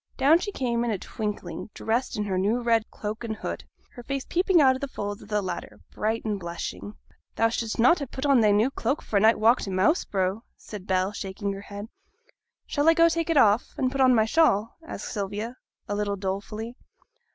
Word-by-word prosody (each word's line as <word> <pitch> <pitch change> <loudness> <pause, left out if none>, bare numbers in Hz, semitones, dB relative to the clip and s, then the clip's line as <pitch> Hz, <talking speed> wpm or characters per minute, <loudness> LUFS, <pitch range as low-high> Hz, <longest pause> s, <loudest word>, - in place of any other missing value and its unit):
Down 290 +5 +5
she 410 - -4
came 240 -7 -1
in 240 - -1
a 215 - 0
twinkling, 210 +2 -5
dressed 230 +2 -1
in 210 - 0
her 190 -3 -1
new 210 +6 +1
red 230 -2 +2
cloak 215 +2 -5
and 220 -2 -3
hood, - - -5 0.3
her 245 - -10
face 275 +2 -4
peeping 360 0 +3
out 265 -3 +6
of 260 - -6
the 280 - -2
folds 205 -5 -5
of - - -13
the 210 -1 0
latter, 180 -2 -6
bright 220 +2 -2
and 210 -2 -1
blushing. 170 +4 -6 0.4
'Thou 225 - +3
should'st 230 -1 -3
na' 245 +8 +6
ha' 285 -7 -4
put 265 - -5
on 275 -4 +5
thy 215 - +4
new 210 +6 +3
cloak 280 +2 -2
for 210 - 0
a - - +5
night 220 +3 +5
walk 230 +3 +4
to - - -4
Moss 190 - +2
Brow,' 190 +2 -1 0.2
said 205 -3 -10
Bell, 185 +1 +1
shaking 200 0 -4
her 195 - -7
head. 205 +1 -8 0.8
'Shall 290 +2 +2
I 330 - +5
go 335 0 +6
take 330 0 -1
it 330 - +2
off, 220 -3 +4
and 255 -1 +1
put 275 0 -1
on 255 -1 +6
my 220 -1 +4
shawl?' 225 -5 +2
asked 325 - -7
Sylvia, 210 +3 -4 0.3
a - - -2
little 205 0 -1
dolefully. 205 +4 -4
220 Hz, 220 wpm, -26 LUFS, 205-260 Hz, 0.8 s, out